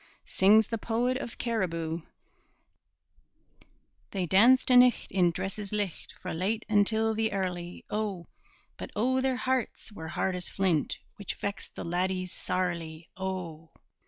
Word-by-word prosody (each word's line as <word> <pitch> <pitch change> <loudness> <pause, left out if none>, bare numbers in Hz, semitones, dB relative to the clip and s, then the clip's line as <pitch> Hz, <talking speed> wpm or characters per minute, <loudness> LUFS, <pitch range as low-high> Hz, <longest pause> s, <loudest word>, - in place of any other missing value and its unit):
Sings 215 +3 +5
the 230 - -2
poet 240 +4 0
of 240 -3 -6
Cariboo: 170 -8 -2 2.1
They 190 -3 -2
danced 235 +9 +5
a' - - +7
nicht 250 -1 +5
in 180 -3 +4
dresses 195 +4 -4
licht 205 -5 -3
Fra' - - -5
late 200 +7 -1
until 220 +1 +3
the 220 0 0
early, 180 -2 -3
O! 205 -5 -2 0.5
But - - -6
O, 260 +4 +2
their 260 -1 +1
hearts 255 -3 -2
were 160 -6 -8
hard 185 +3 -1
as 180 - -2
flint, 185 -6 0 0.2
Which 205 - -5
vexed 200 0 -5
the - - -6
laddies 185 +1 -1
sairly, 170 -3 -3
O! 180 -4 -5
195 Hz, 135 wpm, -29 LUFS, 175-225 Hz, 2.1 s, a